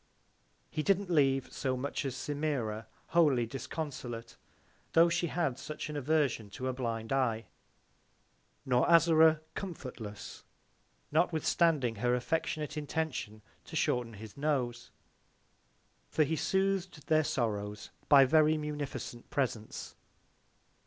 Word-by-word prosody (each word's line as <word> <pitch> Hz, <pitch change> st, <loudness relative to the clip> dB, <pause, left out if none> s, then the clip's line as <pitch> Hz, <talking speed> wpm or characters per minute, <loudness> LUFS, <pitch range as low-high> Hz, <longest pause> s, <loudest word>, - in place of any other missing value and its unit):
He 155 Hz, -, -1 dB
didn't 195 Hz, +2 st, +1 dB
leave 135 Hz, -4 st, +2 dB
so 130 Hz, -1 st, -1 dB
much 140 Hz, +2 st, -3 dB
as 130 Hz, -2 st, -2 dB
Semira 130 Hz, -7 st, -2 dB, 0.2 s
wholly 150 Hz, -8 st, +4 dB
disconsolate, 120 Hz, -3 st, -6 dB, 0.6 s
tho' 165 Hz, +1 st, +6 dB
she 170 Hz, 0 st, 0 dB
had 155 Hz, -6 st, -1 dB
such 155 Hz, +1 st, -5 dB
an -, -, -6 dB
Aversion 145 Hz, -6 st, +1 dB
to 130 Hz, -, -3 dB
a 130 Hz, -, 0 dB
blind 115 Hz, -2 st, -3 dB
Eye; 115 Hz, -4 st, +1 dB, 1.2 s
nor 125 Hz, +2 st, +2 dB
Azora 160 Hz, -1 st, +6 dB
comfortless, 125 Hz, -, -7 dB, 0.7 s
notwithstanding 160 Hz, -, +2 dB
her 125 Hz, +3 st, +2 dB
affectionate 150 Hz, +4 st, -2 dB
Intention 150 Hz, -8 st, -3 dB, 0.2 s
to -, -, -9 dB
shorten 120 Hz, -2 st, 0 dB
his 105 Hz, 0 st, -10 dB
Nose; 130 Hz, -5 st, -1 dB, 1.2 s
for 155 Hz, -, +3 dB
he 155 Hz, +2 st, 0 dB
sooth'd 190 Hz, -2 st, 0 dB
their 155 Hz, 0 st, +3 dB
Sorrows 105 Hz, -6 st, -2 dB, 0.2 s
by 140 Hz, -2 st, +8 dB
very 155 Hz, +2 st, +4 dB
munificent 145 Hz, -5 st, -5 dB
Presents. 120 Hz, -6 st, -3 dB
140 Hz, 110 wpm, -32 LUFS, 120-155 Hz, 1.2 s, by